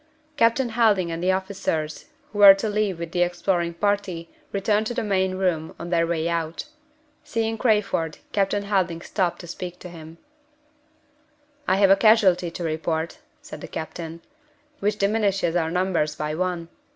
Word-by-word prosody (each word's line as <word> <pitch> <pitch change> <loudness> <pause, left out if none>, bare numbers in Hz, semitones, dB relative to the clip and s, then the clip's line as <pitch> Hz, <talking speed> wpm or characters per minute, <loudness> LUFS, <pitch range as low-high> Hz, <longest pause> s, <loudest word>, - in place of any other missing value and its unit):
Captain 230 +1 +3
Helding 215 -7 +2
and 165 0 -4
the 185 +1 +2
officers 185 -5 -2 0.3
who 205 - -6
were 200 -1 +10
to 195 +3 -3
leave 210 -3 0
with 170 -1 -6
the 175 - 0
exploring 175 -1 0
party 195 -3 -1 0.2
returned 210 +2 +1
to 240 - -4
the - - -1
main 190 -2 0
room 175 -4 -1
on 170 +1 -7
their 165 -1 +2
way 165 -1 -1
out. 165 +2 -2 0.6
Seeing 225 0 -1
Crayford, 200 -9 0
Captain 200 0 0
Helding 185 -5 0
stopped 180 -2 -1
to 175 - -10
speak 180 +1 -6
to 180 - -10
him. 165 -1 -11 1.5
"I 185 - +3
have 195 0 +5
a - - +8
casualty 195 -5 +4
to 170 +1 -6
report," 160 0 -2 0.2
said - - -9
the - - -7
captain, 165 +1 -6 0.6
"which 210 +1 0
diminishes 200 -4 +1
our 165 -2 +1
numbers 175 -4 0
by 150 0 -3
one. 175 0 -2
185 Hz, 165 wpm, -24 LUFS, 170-205 Hz, 1.5 s, were